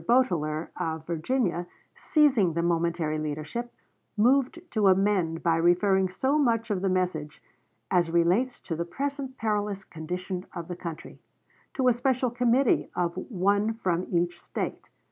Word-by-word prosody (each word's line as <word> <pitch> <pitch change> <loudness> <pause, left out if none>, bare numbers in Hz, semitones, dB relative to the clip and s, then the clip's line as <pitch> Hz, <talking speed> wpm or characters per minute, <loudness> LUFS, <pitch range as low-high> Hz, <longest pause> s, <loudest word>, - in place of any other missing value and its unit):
Boteler, 170 -11 +2
of 160 -2 -3
Virginia, 175 +1 -1 0.3
seizing 265 - +3
the 170 +1 0
momentary 170 -2 0
leadership, 155 +11 -4 0.5
moved 260 +7 +3
to 215 -3 +2
amend 190 -4 +2
by 165 -1 +3
referring 185 +3 +3
so 265 +11 +1
much 230 -5 +1
of 190 -3 0
the 195 - +1
message 180 -5 -1 0.5
"as 175 -2 +3
relates 175 +10 +2
to 165 - -4
the 170 - -2
present 270 - -4
perilous 205 -2 -1
condition 180 +3 -5
of 170 -1 -5
the 175 - -5
country" 170 -3 -8 0.6
to 260 -3 +2
a 250 - +6
special 250 0 0
committee 245 +2 +2
of 175 -1 0
one 200 +2 0
from 185 -5 -1
each 175 0 0
State. - - -5
185 Hz, 145 wpm, -27 LUFS, 170-235 Hz, 0.6 s, a